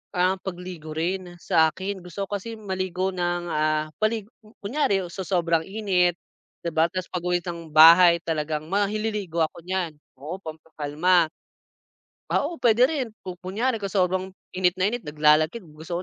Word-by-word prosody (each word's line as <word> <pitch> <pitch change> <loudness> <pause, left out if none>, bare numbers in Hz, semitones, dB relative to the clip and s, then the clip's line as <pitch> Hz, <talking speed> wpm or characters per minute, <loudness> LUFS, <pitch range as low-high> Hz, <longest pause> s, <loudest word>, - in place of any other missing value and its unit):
ang 185 +1 +2
pagligo 175 -4 -7
rin, 175 +2 -2
sa 160 -1 +4
akin. 190 +1 -5
Gusto 195 +3 -5
ko 205 - -2
kasi 230 +3 -7
maligo 185 -2 -2
ng, 175 -1 -2
ah, 155 0 +1
mali 215 0 +1 0.4
kunyari 200 -5 +1
sa 190 +1 -5
sobrang 170 -3 +2
init 190 -4 +1 0.5
'di 170 - -1
ba 160 +1 +4
tas 185 0 -5
pag-uwi 180 0 -1
ng 170 -2 -6
bahay 170 +2 +8
talagang 155 -1 -2
mahi 205 +2 +1
liligo 200 -7 -2
ako 160 - -4
nyan 185 -3 -1 0.3
oo 160 +7 -6
pampakalma. 160 +2 0 1.0
Ah, - - +2
oo 335 +2 -6
pwede 240 0 +5
rin, 275 -7 -2 0.2
kung 180 -1 -7
kunyari 220 +7 -1
kung 200 - -3
sobrang 185 -1 +1 0.3
init 180 -1 +2
na 190 +2 +2
init 245 - -3
naglalakit 155 +7 +3
gusto 165 +3 -6
180 Hz, 155 wpm, -25 LUFS, 165-195 Hz, 1.0 s, bahay